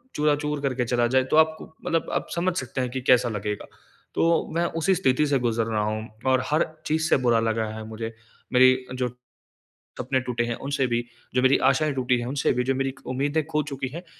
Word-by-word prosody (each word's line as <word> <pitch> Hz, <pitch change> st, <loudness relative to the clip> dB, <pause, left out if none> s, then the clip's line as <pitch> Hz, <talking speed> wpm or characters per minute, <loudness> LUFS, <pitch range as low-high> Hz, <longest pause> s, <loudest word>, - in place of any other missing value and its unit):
चूरा-चूर 150 Hz, 0 st, 0 dB
करके 130 Hz, -3 st, 0 dB
चला 120 Hz, 0 st, +2 dB
जाए 130 Hz, +2 st, +3 dB
तो -, -, +4 dB
आप 160 Hz, 0 st, +5 dB
को -, -, -8 dB, 0.2 s
मतलब 165 Hz, -1 st, 0 dB
आप -, -, -1 dB
समझ 175 Hz, +1 st, 0 dB
सकते 130 Hz, 0 st, -3 dB
हैं 125 Hz, -, -1 dB
कि 130 Hz, +1 st, -3 dB
कैसा 125 Hz, -1 st, +4 dB
लगेगा। 105 Hz, -1 st, -4 dB, 0.5 s
तो 165 Hz, 0 st, +2 dB
मैं 170 Hz, -, +2 dB, 0.2 s
उसी 190 Hz, +3 st, +3 dB
स्थिति 150 Hz, -4 st, +2 dB
से 140 Hz, -2 st, +2 dB
गुज़र 115 Hz, -2 st, 0 dB
रहा 110 Hz, -2 st, -1 dB
हूँ, 110 Hz, +1 st, -3 dB, 0.2 s
और 130 Hz, -1 st, +3 dB
हर 155 Hz, +2 st, +3 dB, 0.2 s
चीज़ 160 Hz, +1 st, +1 dB
से -, -, +5 dB
बुरा 115 Hz, -1 st, +4 dB
लगा 115 Hz, 0 st, 0 dB
है 110 Hz, -, -6 dB
मुझे, 115 Hz, +1 st, -6 dB, 0.4 s
मेरी 130 Hz, 0 st, +5 dB
जो 125 Hz, -1 st, -1 dB, 0.9 s
सपने 130 Hz, -, 0 dB
टूटे 120 Hz, -2 st, -2 dB
हैं 120 Hz, 0 st, -2 dB
उनसे 140 Hz, -2 st, +1 dB
भी, 120 Hz, -1 st, -1 dB, 0.3 s
जो 125 Hz, -, +3 dB
मेरी 130 Hz, +1 st, +5 dB
आशाएँ 150 Hz, +3 st, +1 dB
टूटी 125 Hz, -1 st, +1 dB
हैं 120 Hz, -, -4 dB
उनसे 135 Hz, +2 st, +1 dB
भी, 125 Hz, 0 st, 0 dB
जो 135 Hz, +1 st, +1 dB
मेरी 135 Hz, 0 st, -1 dB
उम्मीदें 145 Hz, +4 st, 0 dB
खो 150 Hz, -1 st, 0 dB
चुकी 135 Hz, -2 st, -4 dB
है 170 Hz, +2 st, -6 dB
130 Hz, 215 wpm, -25 LUFS, 120-150 Hz, 0.9 s, आप